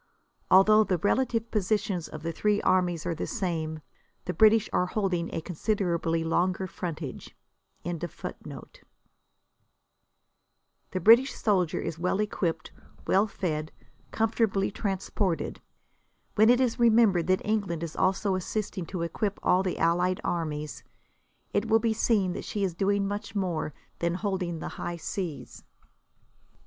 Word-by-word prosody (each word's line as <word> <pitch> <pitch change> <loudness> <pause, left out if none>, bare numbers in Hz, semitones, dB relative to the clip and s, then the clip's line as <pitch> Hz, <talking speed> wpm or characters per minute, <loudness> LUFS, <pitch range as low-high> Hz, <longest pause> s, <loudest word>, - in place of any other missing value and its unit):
Although 215 +3 +7
the 185 -4 0
relative 230 +4 0
positions 205 -4 0
of 155 0 -9
the 165 - -2
three 205 +5 +1
armies 180 -3 +2
are 175 - 0
the 160 - -4
same, 160 -7 -3 0.4
the 180 - -2
British 220 +1 +5
are 180 - +2
holding 180 -4 -1
a - - -3
considerably 170 -2 -1
longer 180 +3 0
frontage.] 165 -7 -6 0.5
The 175 - -7 2.2
British 235 +8 +6
soldier 185 -6 +1
is 165 -1 -4
well 180 +3 0
equipped, 175 -6 -2 0.3
well 200 +3 +3
fed, 155 -6 -3 0.4
comfortably 220 -3 +1
transported. 195 -3 -2 0.7
When 220 +2 +5
it 245 +1 +5
is 250 -2 +1
remembered 220 -7 +4
that 185 0 +1
England 200 -6 -1
is 165 - -5
also 195 +1 +1
assisting 185 -1 -3
to 180 -2 -3
equip 200 +4 -2
all 180 - +4
the 185 -2 -2
allied 175 +2 +2
armies, 155 -3 -3 0.7
it 205 - +1
will 220 0 +5
be 225 0 +1
seen 210 -5 +1
that - - -5
she 205 - -3
is 185 -3 0
doing 200 +2 +1
much 205 +1 -5
more 175 -6 -1 0.3
than 170 0 0
holding 185 -3 -2
the - - -5
high 175 0 -3
seas. 170 -1 -5
185 Hz, 135 wpm, -28 LUFS, 170-210 Hz, 2.2 s, Although